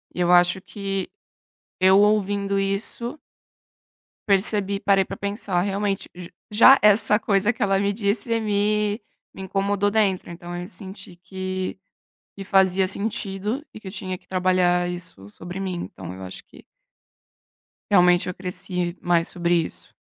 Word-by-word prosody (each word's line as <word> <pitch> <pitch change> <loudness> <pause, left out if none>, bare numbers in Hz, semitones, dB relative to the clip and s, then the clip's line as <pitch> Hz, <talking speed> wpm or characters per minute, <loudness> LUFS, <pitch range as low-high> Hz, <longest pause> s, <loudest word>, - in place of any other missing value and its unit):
E - - -6
eu 175 0 +2
acho 175 +1 +5
que 195 -1 -4 0.7
eu 190 +1 +5
ouvindo 200 -1 +1
isso 215 +8 -3 1.1
percebi, 200 0 +1
parei 195 -1 +3
pra - - -7
pensar: 200 -3 -2
"realmente". 200 0 -2
J 175 -1 -9 0.2
Já 230 +6 +7
essa 210 0 +5
coisa 205 0 +1
que 245 - -8
ela 195 -1 +2
me 200 +1 +1
disse 220 +2 0
me 210 0 0 0.3
me - - -8
incomodou 200 +1 0
dentro, 200 -5 0
então, 175 +1 -8
eu 175 - -5
senti 190 -4 -10
que 185 +1 -5 0.6
que 200 - -8
fazia 190 -1 +3
sentido, 205 +4 -1
e - - -8
que 210 - -10
eu - - -9
tinha 185 -2 -4
que - - -25
trabalhar 180 -1 +2
isso 175 - -8
sobre 175 - -8
mim, 190 -2 -3
então, 90 -2 -9
eu 95 - -10
acho 95 0 -8
que - - -17 1.3
realmente 180 -2 +4
eu 180 - -4
cresci 180 -1 -4
mais 170 -1 +1
sobre 175 0 0
isso. 165 -2 -3
195 Hz, 150 wpm, -23 LUFS, 180-205 Hz, 1.3 s, Já